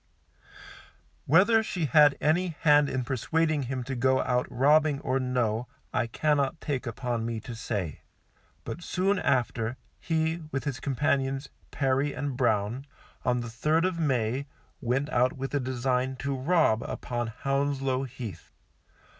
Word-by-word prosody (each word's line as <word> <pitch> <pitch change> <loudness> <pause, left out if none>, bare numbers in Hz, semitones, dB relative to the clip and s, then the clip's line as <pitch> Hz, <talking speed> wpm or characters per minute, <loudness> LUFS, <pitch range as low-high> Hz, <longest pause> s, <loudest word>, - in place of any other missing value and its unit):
Whether 200 - +5
she 180 -6 -2
had 145 +1 +5
any 165 +2 +1
hand 145 -2 +5
in 130 -1 -1
persuading 145 +2 0
him 130 -1 -2
to 135 +2 -5
go 130 +1 +2
out 125 0 0
robbing 145 +3 +3
or 130 +1 0
no, 125 -2 0 0.3
I 120 - +1
cannot 145 +4 0
take 140 -4 -3
upon 120 0 -2
me 115 -1 -3
to 120 +2 -7
say, 105 - -4 0.6
but - - -6
soon 185 +2 0
after, 120 -2 0 0.2
he, 160 0 0
with 135 - -2
his 140 -4 -3
companions, 135 0 0 0.2
Perry 135 +1 0
and 140 -3 -3
Brown, 120 +2 0 0.4
on 125 -1 +1
the 120 - -5
3rd 155 +9 +1
of 185 -2 -1
May, 130 -2 0 0.3
went 135 +3 0
out 125 -1 +3
with 135 +1 -5
a 145 - +2
design 130 0 -1
to 140 +2 -3
rob 135 -5 +2
upon 120 -1 -3
Hounslow 135 +2 -1
Heath. 115 -9 -8
135 Hz, 145 wpm, -28 LUFS, 125-145 Hz, 0.6 s, Whether